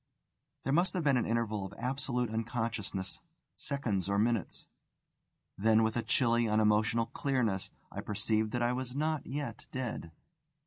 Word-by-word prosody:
There 135 - 0
must 175 +4 +3
have 180 - -1
been 140 -2 +4
an 120 - 0
interval 110 -3 0
of 95 +1 -7
absolute 125 -2 -1
unconsciousness, 110 -4 -3 0.3
seconds 110 - -2
or 100 - +2
minutes. 110 -2 0 0.9
Then 110 +2 +5
with 110 0 +1
a 120 - +1
chilly, 115 +1 +2
unemotional 110 +1 +3
clearness, 115 -8 0 0.2
I - - -4
perceived 110 +1 0
that 120 -1 +1
I 120 +1 +2
was 125 0 -4
not 155 0 0
yet 145 +1 -4
dead. 120 - -4
115 Hz, 145 wpm, -32 LUFS, 110-130 Hz, 0.9 s, Then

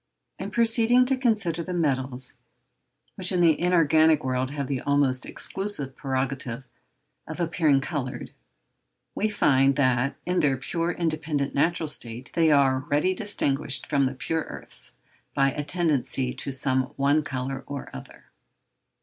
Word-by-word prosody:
In 195 - -4
proceeding 235 +2 +4
to 265 +1 +1
consider 210 -10 0
the 180 +2 -5
metals, 130 -5 -1 0.8
which 185 -1 +2
in 180 - +1
the 165 -3 +4
inorganic 160 -3 +4
world 130 0 -1
have 140 0 -4
the 130 -1 -3
almost 140 -3 +1
exclusive 190 -10 -3
prerogative 130 -2 -3 0.6
of - - -7
appearing 160 -4 +2
coloured, 135 -4 -5 0.8
we 215 - 0
find 135 -9 +3
that, 130 -1 +1
in 180 0 0
their 135 -3 +2
pure, 165 +6 -2
independent, 155 -4 -2
natural 165 +3 +1
state, 120 -4 -6
they 165 -1 +3
are 135 -3 +3
already 150 +7 +1
distinguished 140 - 0
from 140 -1 +1
the 135 - -5
pure 160 +4 -2
earths - - -10 0.4
by 135 -1 +3
a 150 - -4
tendency 145 -5 -1
to 140 - -5
some 130 -1 +2
one 140 +3 +2
colour 135 -1 -4
or 140 -2 -7
other. - - -12
145 Hz, 140 wpm, -25 LUFS, 130-170 Hz, 0.8 s, proceeding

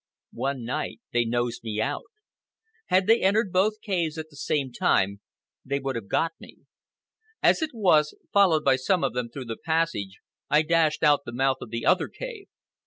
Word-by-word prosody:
One 135 -3 -3
night 125 - -3
they 120 0 +2
nosed 120 0 -2
me 110 -2 -3
out. 140 +6 -2 0.8
Had 185 +1 +3
they 225 +3 +4
entered 200 +1 +2
both 210 +4 +2
caves 170 -6 -1
at 160 0 -7
the - - -16
same 140 -2 -1
time 100 -3 +1 0.4
they 140 +1 -1
would 135 -1 -3
have 115 -4 -5
got 165 - +1
me. - - -13 0.9
As - - +4
it 315 - 0
was, 175 -10 +2 0.2
followed 180 -6 +4
by 130 - +4
some 180 +7 +1
of - - 0
them 125 -1 -3
through 130 +2 -7
the 115 -1 -5
passage, 160 - -1 0.3
I 150 +1 +4
dashed 160 -1 +2
out 145 -2 +5
the 120 - -7
mouth 135 +2 +1
of - - -8
the 115 0 -4
other 185 - +3
cave. 460 -6 -8
150 Hz, 185 wpm, -26 LUFS, 120-185 Hz, 0.9 s, out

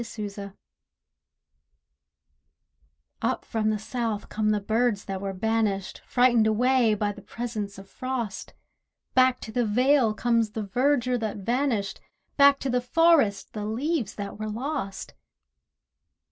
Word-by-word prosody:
NO - - -2 0.2
SPRING 200 -1 -8 2.7
Up - - -1
from 220 -2 0
the 215 - +1
South 220 -1 -3
come 215 0 0
the 210 -1 +2
birds 220 0 0
that 190 -1 -4
were 195 -1 -3
banished, 205 -1 -1
Frightened 245 -3 +4
away 240 0 +3
by 205 0 -1
the 205 - -11
presence 215 -3 -5
of 195 0 -11
frost. 245 -4 -5 0.6
Back 255 0 +4
to 220 - -7
the 245 +2 +1
vale 245 +1 +3
comes 230 -2 +1
the 220 - -3
verdure 250 +3 +1
that 220 -2 -3
vanished, 230 -1 -1 0.3
Back 280 -1 +6
to 270 - -2
the 250 0 +1
forest 280 -7 +3
the 210 -1 -4
leaves 255 - -1
that 200 0 -6
were 215 0 -3
lost. 230 -3 -4
225 Hz, 135 wpm, -26 LUFS, 205-250 Hz, 2.7 s, Back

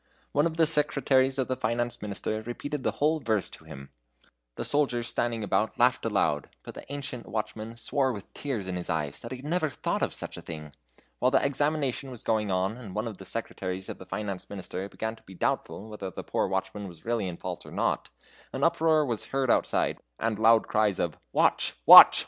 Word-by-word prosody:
One 145 +3 +3
of 165 -1 -6
the 165 - +5
secretaries 140 -3 +2
of 130 - 0
the 130 - 0
Finance 120 0 -1
Minister 105 +1 -3
repeated 130 +5 -4
the - - 0
whole 155 +2 +2
verse 110 -7 0
to - - -11
him. 70 0 -10 0.6
The - - -4
soldiers 125 -5 +1
standing 115 -2 -1
about 110 +4 0
laughed 125 0 +3
aloud, 100 -9 +1
but - - -8
the - - -10
ancient 140 -4 -5
watchman 110 +1 -4
swore 130 +3 +1
with 105 -5 -8
tears 120 -10 -3
in 90 -1 -2
his 90 - -5
eyes 75 -4 -1
that 115 - -8
he 130 - -4
had 130 - -11
never 160 0 +1
thought - - -2
of - - 0
such - - -4
a - - -7
thing. 75 -2 -8 0.5
While 125 - +4
the 130 - +3
examination 140 -2 0
was 125 -3 -7
going 110 -2 +1
on, 95 +4 0
and 105 -7 -9
one 110 +2 -1
of 110 -4 -6
the 95 - -8
secretaries 95 -4 -4
of - - -6
the 95 - -11
Finance 100 0 -4
Minister 95 0 -5
began 110 +2 -4
to - - -19
be 95 -4 -13
doubtful 100 +4 -2
whether 105 -3 -5
the - - -7
poor - - 0
watchman 95 +2 -3
was 85 -3 -13
really 115 -4 0
in 85 -2 -5
fault - - -5
or - - -12
not, - - 0 0.4
an 130 - -2
uproar 160 -2 +4
was 120 -5 -1
heard 135 -3 +1
outside, - - +1 0.2
and 110 -2 -1
loud 115 0 +5
cries 105 -3 +2
of 85 -4 -2
"Watch, - - +2
watch!" - - +12
115 Hz, 215 wpm, -28 LUFS, 100-135 Hz, 0.6 s, watch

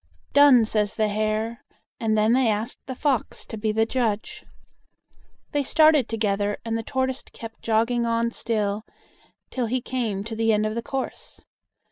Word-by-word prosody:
"Done," 275 -4 +7
says 210 -1 0
the 215 -1 +1
Hare, 215 +2 -1 0.4
and 220 -1 +1
then 215 +2 +3
they 255 -1 +3
asked 215 +2 -2
the 260 - -4
Fox 270 -3 -1
to - - -7
be 215 0 -1
the 220 +1 +2
judge. 225 -3 -2 1.1
They 290 - +1
started 310 -2 +4
together, 205 -2 0
and 225 0 -1
the 225 - -1
Tortoise 260 +3 -2
kept 225 -1 -11
jogging 230 +2 +1
on 230 0 +1
still, 215 -3 -1 0.7
till 250 -3 -1
he 255 +3 0
came 235 -6 -2
to 225 +1 -5
the 225 0 +2
end 210 0 +2
of 215 - -1
the 235 - -2
course. 265 +2 -5
225 Hz, 165 wpm, -24 LUFS, 215-250 Hz, 1.1 s, Done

